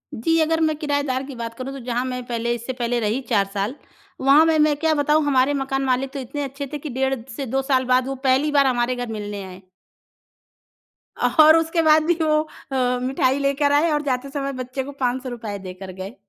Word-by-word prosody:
जी, 325 +9 +1
अगर 325 +1 +1
मैं 310 -1 +2
किरायेदार 285 -3 -1
की 270 -1 -8
बात 230 -1 -5
करूँ, 255 +3 -6
तो 275 - -7
जहाँ 245 0 -1
मैं 250 -1 -4
पहले, 235 0 -1
इससे 240 +2 -5
पहले 245 -1 -1
रही 220 +4 -1
4 205 -5 +3
साल, 205 +6 -2 0.5
वहाँ 280 +4 +6
में 320 -1 +3
मैं 300 -1 +4
क्या 320 +1 +1
बताऊँ, 300 +1 +2
हमारे 270 0 +3
मकान 270 -1 -1
मालिक 260 +1 0
तो 280 - -4
इतने 280 +3 -5
अच्छे 275 +1 -5
थे 295 - -1
कि 300 - -6
डेढ़ 265 +1 0 0.2
से 275 - -3
2 265 +2 -1
साल 265 -1 +1
बाद, 255 0 +2
वो 270 - -3
पहली 275 +4 +3
बार 285 -1 +4
हमारे 245 0 +1
घर 245 0 -4
मिलने 205 -2 -5
आए। 185 0 -10 1.6
और 315 +1 +6
उसके 330 +1 +1
बाद 310 -1 +5
भी 345 - +3
वो 305 -1 +3 0.3
अ, 250 -1 +1
मिठाई 260 +1 +1
लेकर 280 +1 +1
आए 295 +4 +3
और 295 - +1
जाते 270 -1 -2
समय 275 -1 -3
बच्चे 255 +2 -4
को 285 - -8
₹500 245 -4 -3
देकर 185 0 -8
गए। 190 +5 -8
265 Hz, 215 wpm, -22 LUFS, 245-290 Hz, 1.6 s, वहाँ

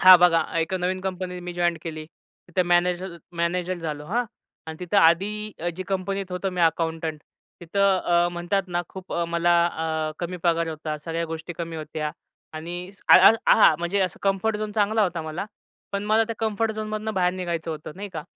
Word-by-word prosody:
हां 185 0 +11
बघा, 170 -1 +5 0.2
एक 165 +3 0
अ, - - +2
नवीन 185 +1 -1
कंपनी 185 -1 -4
मी 180 0 -6
जॉइंट 175 -1 0
केली. 155 -2 -6 0.4
तिथं 180 +1 +1
मॅनेजर 175 +1 +1 0.2
मॅनेजर 180 +2 0
झालो, 150 -3 -5
हां? 240 +7 0 0.4
आणि 160 0 -6
तिथं 180 +3 -1
आधी 205 +5 +3
अ, 175 - -1
जी 185 - -3
कंपनीत 195 0 -2
होतो 180 +2 -2
मी 180 -1 -3
अकाउंटंट, 160 -2 0 0.4
तिथं 195 +3 +2
अ, 175 0 +3
म्हणतात 185 +3 -1
ना, 175 0 -1
खूप 190 -1 -9
अ, 170 - 0
मला 175 +1 +3
अ, 160 -2 -2
कमी 180 +1 -4
पगार 170 -1 +2
होता. 155 -1 -4
सगळ्या 165 0 -2
गोष्टी 160 +1 -6
कमी 165 -1 -4
होत्या 155 -1 -4 0.4
आणि 175 +3 -6
स 200 - -23
अ, - - +10
अ, - - +9
आ - - +7
हां, - - +8
म्हणजे 175 +4 0
असं 185 -3 -1
कम्फर्ट 200 +2 +1
झोन 210 0 -4
चांगला 215 +1 +2
होता 175 -4 -1
मला, 160 +5 -4 0.5
पण 200 +1 -2
मला 220 +2 +3
त्या 230 +1 -4
कम्फर्ट 220 0 0
झोनमधनं 215 0 -4
बाहेर 180 -1 +2
निघायचं 170 -3 -3
होतं, 155 -1 -6
नाही 205 +1 -6
का? 155 -2 -4
175 Hz, 200 wpm, -25 LUFS, 165-195 Hz, 0.5 s, हां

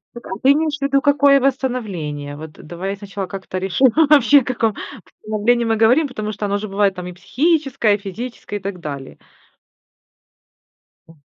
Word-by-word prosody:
Так, 240 - -10
а - - -9
ты 270 - +6
имеешь 305 +1 0
ввиду 275 0 +2
какое 285 -1 +4
восстановление? 205 - -2
Вот 155 +1 -9
давай 180 +6 -6
сначала 200 -1 -6
как-то 185 0 -6
решим, 190 +8 +3 0.2
вообще 285 -1 +6
о - - -6
каком 230 -4 0 0.4
восстановлении 220 +3 0
мы 225 0 +1
говорим, 245 +8 +4
потому 215 -4 -5
что 210 0 -4
оно 200 0 0
же 215 - -5
бывает 195 -1 +1
там 180 0 -6
и 180 - -6
психическое, 255 - +1
физическое, 210 +2 -7
и - - -2
так 195 -2 -5
далее. 140 -4 -7 1.9
М. 165 -2 -19
215 Hz, 165 wpm, -19 LUFS, 190-260 Hz, 1.9 s, ты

